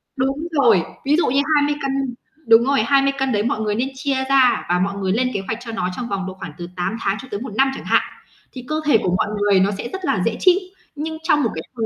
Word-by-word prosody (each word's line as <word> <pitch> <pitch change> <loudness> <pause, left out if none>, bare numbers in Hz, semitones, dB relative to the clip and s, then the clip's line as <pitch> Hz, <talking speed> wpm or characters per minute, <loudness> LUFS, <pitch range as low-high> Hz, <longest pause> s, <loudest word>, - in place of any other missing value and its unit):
Đúng 275 +4 -1
rồi. 235 - +4 0.2
Ví 290 +2 +3
dụ - - +2
như 275 +3 +2
20 290 0 +2
cân 270 -2 -2 0.3
đúng 225 0 +7
rồi, 275 +2 +2
20 275 -1 +3
cân 270 -1 0
đấy 205 -1 +1
mọi 225 -1 -1
người 210 -1 -1
nên 245 +4 0
chia 265 -1 -1
ra 265 -2 +4
và 180 0 +2
mọi 200 +2 -1
người 190 -1 -1
lên 250 +5 +1
kế 200 - -1
hoạch 225 - -2
cho 235 -2 -7
nó 220 -5 -2
trong 245 - -4
vòng 195 -1 -2
độ 190 - -5
khoảng 185 -4 -8
từ 175 0 -6
8 180 +4 -2
tháng 195 +2 0
cho 260 - -12
tới 205 - -3
1 230 -3 -7
năm 270 +3 +3
chẳng - - -9
hạn, - - +3 0.5
thì 255 -1 -9
cơ 310 - -2
thể 295 -6 +5
của 180 0 +1
mọi - - 0
người 205 -2 +4
nó 195 +2 +2
sẽ 235 - -5
rất 380 -1 -5
là - - 0
dễ - - 0
chịu. 370 0 +5 0.4
Nhưng 315 +2 -4
trong 300 -3 +3
một 230 - +1
cái 160 - -4
thời 225 -2 -1
250 Hz, 280 wpm, -20 LUFS, 205-275 Hz, 0.5 s, đúng